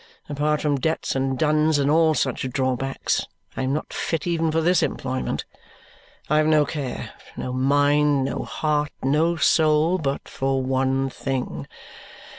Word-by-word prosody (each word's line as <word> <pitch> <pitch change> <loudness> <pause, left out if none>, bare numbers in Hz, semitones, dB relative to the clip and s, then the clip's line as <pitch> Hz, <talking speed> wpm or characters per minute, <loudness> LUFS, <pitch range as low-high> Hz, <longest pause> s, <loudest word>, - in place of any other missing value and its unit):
Apart 150 +1 0
from 145 -2 0
debts 160 +1 -1
and 135 0 0
duns 155 0 +2
and 140 0 +2
all 160 0 +4
such 130 -1 -1
drawbacks, 130 0 -1 0.3
I - - -3
am 130 0 0
not 150 - -3
fit 165 -3 -2
even 165 -2 0
for 160 - +1
this 175 +2 +3
employment. 130 0 -2 0.8
I 150 - +2
have 155 0 +3
no 155 -1 +4
care, 140 -4 -5 0.3
no 125 - -4
mind, 145 +1 +3
no - - -3
heart, 150 -1 -1
no 155 +5 +2
soul, 160 +2 +3
but 140 -3 -3
for 135 0 -1
one 135 +1 0
thing. 125 - -4
145 Hz, 150 wpm, -23 LUFS, 135-155 Hz, 0.8 s, all